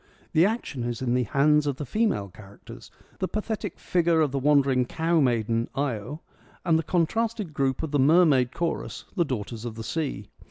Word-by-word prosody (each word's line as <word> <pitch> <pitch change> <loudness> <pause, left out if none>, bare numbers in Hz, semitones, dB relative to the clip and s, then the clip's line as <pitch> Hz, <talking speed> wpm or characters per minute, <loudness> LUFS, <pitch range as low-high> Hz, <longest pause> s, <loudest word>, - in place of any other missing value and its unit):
The 165 +4 +5
action 210 - -3
is 120 +1 -3
in 120 -1 0
the 125 -1 +1
hands 150 +5 +3
of 140 - 0
the 145 - -5
female 205 - 0
characters, 100 +1 -13 0.3
the 185 - 0
pathetic 215 +1 -4
figure 170 -2 +1
of 150 -3 +1
the 140 - -1
wandering 135 -2 +3
cow 165 +4 0
maiden, 115 -3 +1
Io, 135 +2 -3 0.4
and 165 -2 +3
the - - +1
contrasted 195 +2 -1
group 135 +1 0
of 160 - -3
the 145 - +1
mermaid 140 -4 +4
chorus, 170 +3 -3
the 175 -4 +2
daughters 115 -4 -5
of 120 -2 -5
the 115 - -6
sea. 155 +2 -4
145 Hz, 185 wpm, -26 LUFS, 125-165 Hz, 0.4 s, The